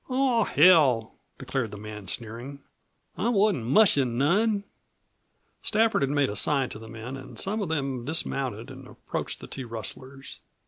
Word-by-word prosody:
"Aw, 255 -4 +2
hell!" 145 -9 +5 0.2
declared 130 -4 -2
the 105 - -8
man, 105 -1 -8
sneering. 120 +7 -7 0.6
"I 215 +6 +1
wasn't 205 - +2
mushin' 135 - +4
none!" 200 - +2 1.0
Stafford 225 -3 +2
had 135 - +1
made 145 -4 +1
a - - -5
sign 135 +4 +1
to 110 - -8
the 110 0 -11
men 115 +3 -7
and 135 0 -10
some 210 +3 -2
of 190 - -2
them 135 -6 -2
dismounted 130 -6 -3
and - - -11
approached - - -5
the - - -7
two 130 -3 -7
rustlers. 130 +5 -8
135 Hz, 155 wpm, -27 LUFS, 115-190 Hz, 1.0 s, hell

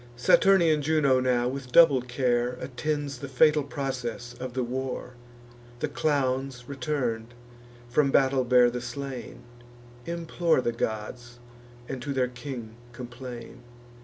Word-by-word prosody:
Saturnian 165 +4 +4
Juno 145 -3 +3
now, 125 -1 +1
with 130 -1 -5
double 145 -4 +7
care, 125 0 0
Attends 140 +1 -3
the 140 - -6
fatal 150 +3 +4
process 130 -4 -4
of 125 0 -7
the 130 - 0
war. 130 0 -4 0.6
The - - -2
clowns, 135 -4 -1
return'd, 125 -4 -3 0.5
from 140 +4 +2
battle 135 -1 +3
bear 125 -1 +5
the 125 0 -4
slain, 135 0 -6 0.7
Implore 170 -1 0
the 120 - 0
gods, 115 +2 -4 0.5
and 135 -2 -5
to 140 +3 -3
their 130 -2 +1
king 125 -3 -8 0.2
complain. 125 -1 -9
130 Hz, 125 wpm, -27 LUFS, 120-140 Hz, 0.7 s, double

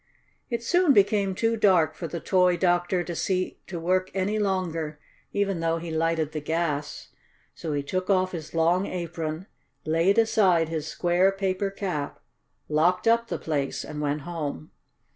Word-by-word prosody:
It 235 -2 -2
soon 350 +3 +4
became 200 -2 +3
too 225 +3 +1
dark 185 -8 +4
for 170 - -6
the 170 - -5
toy 180 0 +3
doctor 175 0 +1
to 170 0 -5
see 185 +2 -1
to 175 -3 -5
work 185 +2 +1
any 200 +3 0
longer, 165 -6 -2 0.3
even 200 -3 0
though 165 0 0
he 165 0 -6
lighted 160 -1 0
the 155 - -4
gas. 150 -1 -2 0.4
So 160 -3 -4
he 145 -1 -1
took 185 +6 -3
off 185 -1 +2
his 165 -2 -7
long 170 +4 +2
apron, 165 -1 -4 0.4
laid 165 +5 +2
aside 190 -7 +3
his 160 -2 -3
square, 175 +3 +2
paper 195 0 -1
cap, 180 -7 -4 0.5
locked 175 +7 +2
up 230 0 +3
the - - -3
place 145 -4 -2
and 150 -1 -6
went 145 0 -1
home. 150 - -5
175 Hz, 160 wpm, -26 LUFS, 160-195 Hz, 0.5 s, soon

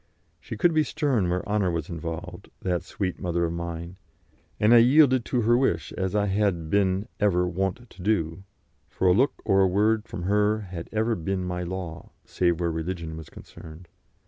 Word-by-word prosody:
She - - -8
could 175 -2 +3
be 155 - +4
stern 140 - 0
where 90 +1 -2
honour 105 -3 +1
was 85 -3 -2
involved, 85 -1 -6
that 90 -2 0
sweet 95 -3 -4
mother 85 -2 0
of 85 - -3
mine, 85 +1 -6 0.6
and 105 +3 +5
I 120 - +9
yielded 130 0 +5
to 125 - 0
her 115 +2 +3
wish 120 - 0
as 95 +1 -3
I 105 -1 +2
had 95 -5 0
been 100 0 +1
ever 90 -4 +2
wont 95 +7 -2
to 100 - -14
do, 90 -4 0 0.5
for 95 - 0
a 90 - +6
look 130 +7 +2
or 95 -2 +4
a 95 - +5
word 105 +4 +2
from 90 - -6
her 105 +3 +2
had 90 -4 -8
ever 110 +2 +1
been 95 0 -2
my 90 0 -3
law, 90 -2 -6
save 85 -2 0
where 85 -1 0
religion 80 0 -4
was 80 0 -9
concerned. 80 +2 -13
95 Hz, 190 wpm, -26 LUFS, 85-105 Hz, 0.6 s, I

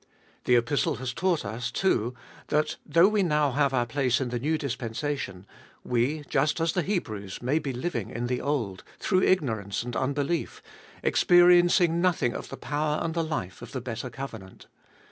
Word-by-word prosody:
The 125 - +4
Epistle 140 +6 +1
has 130 0 -4
taught 180 -3 0
us, 115 +4 -3
too, 125 - 0 0.3
that 150 +1 0
though 165 +5 +5
we 210 -1 +2
now 150 -5 +2
have 140 +1 +2
our 125 -2 +1
place 125 0 +1
in 130 -2 -2
the 120 0 -2
new 155 +5 0
dispensation, 125 -6 -4 0.4
we, 125 +5 0
just 150 +4 +1
as 165 0 +1
the 180 - +1
Hebrews, 110 - -3
may 140 +6 +2
be 145 -3 -3
living 120 - -3
in 120 +1 -4
the 125 0 -1
old, 115 -10 -2
through 185 -2 +1
ignorance 110 - +1
and 120 -1 -6
un 130 +1 0
belief, 145 +4 -2 0.4
experiencing 175 -1 +5
nothing 175 -9 +2
of - - -6
the - - -7
power 150 +1 -1
and 165 - -2
the 165 0 0
life 120 - -4
of - - -10
the 130 - -3
better 120 +1 -5
covenant. 115 -7 -9
140 Hz, 180 wpm, -27 LUFS, 120-160 Hz, 0.4 s, though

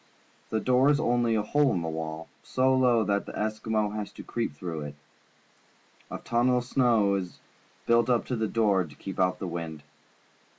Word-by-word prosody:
The 110 - 0
door 130 +4 +3
is 145 -1 +3
only 120 -5 +2
a 105 - +1
hole 145 +4 +2
in 85 - -1
the - - -3
wall, 80 0 -5
so 130 +1 +1
low 125 -3 +3
that 100 -1 -1
the - - -7
Eskimo 110 0 -1
has 105 -1 -4
to - - -10
creep 115 -11 -3
through 80 -2 -5
it. 75 0 -7 1.1
A - - -5
tunnel 125 +2 +1
of 125 - -1
snow 120 -5 +2
is 95 -3 -4 0.5
built 115 0 +3
up 120 -2 +2
to 125 - -2
the 110 -1 -1
door 105 -4 +2
to 75 -4 -12
keep 95 +5 -7
out 90 0 +2
the - - -5
wind. 85 -3 -5
110 Hz, 195 wpm, -27 LUFS, 90-120 Hz, 1.1 s, door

